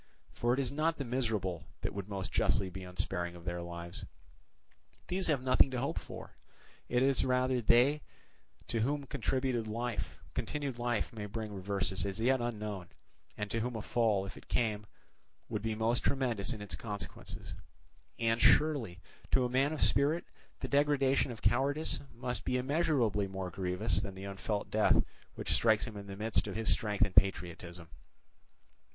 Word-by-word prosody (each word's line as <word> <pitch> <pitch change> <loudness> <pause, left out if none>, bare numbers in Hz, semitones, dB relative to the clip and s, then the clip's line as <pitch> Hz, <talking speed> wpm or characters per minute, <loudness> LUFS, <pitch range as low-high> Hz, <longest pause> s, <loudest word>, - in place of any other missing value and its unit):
For 120 - 0
it - - -2
is 135 -2 0
not 155 +3 +1
the 140 - -3
miserable 110 -9 -1
that - - -2
would 100 0 -5
most 95 -2 -3
justly 95 -3 +2
be 95 +1 -7
unsparing 90 -1 -3
of 85 0 -12
their 85 -1 -2
lives; 85 0 -7 1.1
these 185 +1 0
have 145 -5 +1
nothing 130 +1 +5
to 130 -2 -2
hope 140 - -1
for: - - -10 0.5
it 125 +1 +3
is 135 0 +3
rather 130 -1 +2
they 125 +7 +5 0.6
to 115 - -1
whom 140 +6 +1
continued 130 -3 -1
life 120 +2 -2
may 105 -2 -5
bring 110 0 -5
reverses 95 0 0
as 100 +2 -4
yet 130 +2 +3
unknown, 105 -6 -3 0.5
and 105 -1 -3
to 115 - 0
whom 120 +1 -2
a 110 - -4
fall, 110 -5 +2
if 95 - -7
it - - -13
came, 105 -3 0 0.6
would 105 -3 -2
be 110 0 -1
most 115 +2 +2
tremendous 125 -6 +1
in 110 -4 -4
its 95 -5 -5
consequences. 100 0 -6 0.6
And 115 0 +1
surely, 130 - +4 0.3
to 130 -2 +3
a - - 0
man 135 +4 +2
of 155 - -3
spirit, 150 +5 +3 0.4
the - - -2
degradation 140 -2 +3
of 115 - -9
cowardice 140 +8 +2
must 125 +1 -3
be 125 - +1
immeasurably 125 - +2
more 95 -1 -4
grievous 90 -1 0
than 100 -3 -5
the 95 +1 -7
unfelt 100 +1 -3
death - - +4 0.3
which - - -2
strikes 110 -2 +4
him 115 -3 -7
in 100 -1 -7
the 100 - -6
midst 110 +2 +1
of - - -4
his 110 0 0
strength 105 0 +2
and 100 - -7
patriotism! 85 -3 +1
115 Hz, 170 wpm, -33 LUFS, 100-130 Hz, 1.1 s, nothing